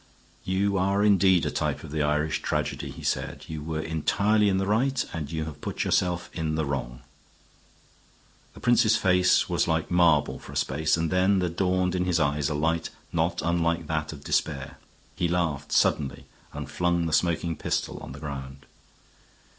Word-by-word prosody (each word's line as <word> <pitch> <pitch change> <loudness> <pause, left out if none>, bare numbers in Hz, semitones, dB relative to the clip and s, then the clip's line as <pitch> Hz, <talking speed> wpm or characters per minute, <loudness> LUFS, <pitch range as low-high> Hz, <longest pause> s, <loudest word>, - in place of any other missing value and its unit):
"You 100 +1 0
are 100 +2 +2
indeed 95 -3 +4
a - - -1
type 75 -3 -2
of 80 - -9
the 80 0 -1
Irish 75 +1 0
tragedy," - - -2
he - - -10
said. - - -2
"You 80 -1 -5
were 80 0 -3
entirely 100 +7 +2
in 95 - +1
the 95 - 0
right, 125 +6 +1
and 75 -4 -4
you 80 -1 -2
have 75 -3 -9
put - - -3
yourself 90 -1 0
in 80 -2 -2
the 80 -1 0
wrong." 65 -3 -4 1.5
The - - -12
prince's 120 -2 +4
face 90 -1 +3
was - - 0
like 80 0 0
marble 85 -4 +3
for - - -11
a - - -3
space 75 +4 +1
then 90 +4 +2
there 90 -2 +1
dawned 90 +1 0
in 90 -1 0
his 90 -2 +1
eyes 70 -1 +1
a 75 - -2
light 80 +2 0 0.2
not - - 0
unlike 85 0 0
that 80 0 -2
of 70 -2 -10
despair. 70 -3 -2 0.4
He 85 - 0
laughed 85 -5 -1
suddenly 70 -3 +1 0.3
and 75 -2 -6
flung 85 +3 0
the 80 - -2
smoking 85 +1 +1
pistol - - -2
on - - -9
the 70 - -10
ground. 70 -2 -7
80 Hz, 180 wpm, -26 LUFS, 75-90 Hz, 1.5 s, indeed